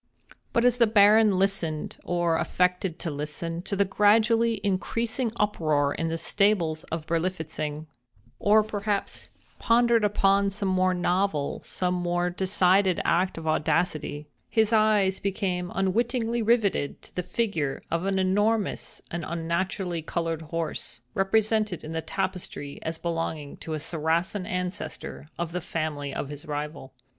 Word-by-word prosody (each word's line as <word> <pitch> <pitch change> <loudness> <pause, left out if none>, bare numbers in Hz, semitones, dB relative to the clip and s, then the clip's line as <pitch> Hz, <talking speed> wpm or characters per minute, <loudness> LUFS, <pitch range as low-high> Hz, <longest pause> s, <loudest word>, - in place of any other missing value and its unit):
But 235 - +2
as 245 -1 +4
the 235 -2 +5
Baron 210 -1 +6
listened, 185 -5 -1
or 175 -2 +1
affected 180 -1 0
to 170 - -4
listen, 150 +3 -4
to 200 - -3
the 200 +1 +3
gradually 225 +3 +3
increasing 225 +5 -1
uproar 155 -10 +1
in 165 - -2
the 165 0 -1
stables 175 -5 +1
of 160 -1 -5
Berlifitzing—or 155 - -1
perhaps 205 -1 -2 0.3
pondered 235 -1 +4
upon 200 -1 +3
some 195 0 -2
more 185 0 +2
novel, 180 -4 0
some 180 -1 -1
more 175 0 0
decided 185 0 +3
act 180 +1 +2
of 165 - -6
audacity—his 155 +6 0
eyes 210 -3 +3
became 185 -3 -2
unwittingly 230 +4 +1
rivetted 215 -10 +1
to - - -12
the 180 - 0
figure 175 -8 -1
of 170 +3 0
an 195 -1 +1
enormous, 205 +3 0
and 170 0 -3
unnaturally 170 +2 -2
colored 165 0 -2
horse, 165 -5 -4
represented 215 -1 +1
in 155 - -6
the 165 0 -2
tapestry 180 -6 -4
as 160 0 -3
belonging 165 -4 -3
to 160 - -6
a - - -3
Saracen 165 +5 -1
ancestor 180 -3 -4
of 170 -1 -3
the 180 +1 -3
family 155 -4 -3
of 140 - -4
his 145 0 -8
rival. 150 -2 -5
180 Hz, 135 wpm, -26 LUFS, 160-205 Hz, 0.3 s, Baron